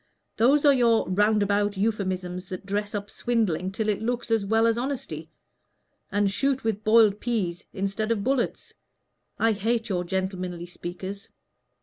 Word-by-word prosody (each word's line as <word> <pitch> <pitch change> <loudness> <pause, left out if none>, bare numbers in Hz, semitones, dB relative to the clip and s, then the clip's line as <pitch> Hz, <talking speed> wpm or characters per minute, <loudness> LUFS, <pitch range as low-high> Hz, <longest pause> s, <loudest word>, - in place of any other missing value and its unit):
Those 280 +6 +4
are 285 - +7
your 235 -3 +3
roundabout 205 +1 +2
euphuisms 185 -3 -2
that 185 +1 -6
dress 205 +1 -2
up 205 0 -4
swindling 200 -7 0
till 215 +2 -2
it 210 -1 0
looks 240 +1 -2
as 225 -2 +3
well 225 +3 +2
as 230 -1 +3
honesty, 240 - -4 0.8
and 205 -1 +2
shoot 265 +6 0
with 220 -2 -1
boiled 215 -2 +5
peas 195 -8 -2
instead 200 +3 -2
of 210 -3 0
bullets. 260 +1 -1 0.6
I 225 - +3
hate 225 +2 -1
your 180 -2 0
gentlemanly 185 -1 -3
speakers." 185 +3 -7
205 Hz, 145 wpm, -26 LUFS, 190-230 Hz, 0.8 s, are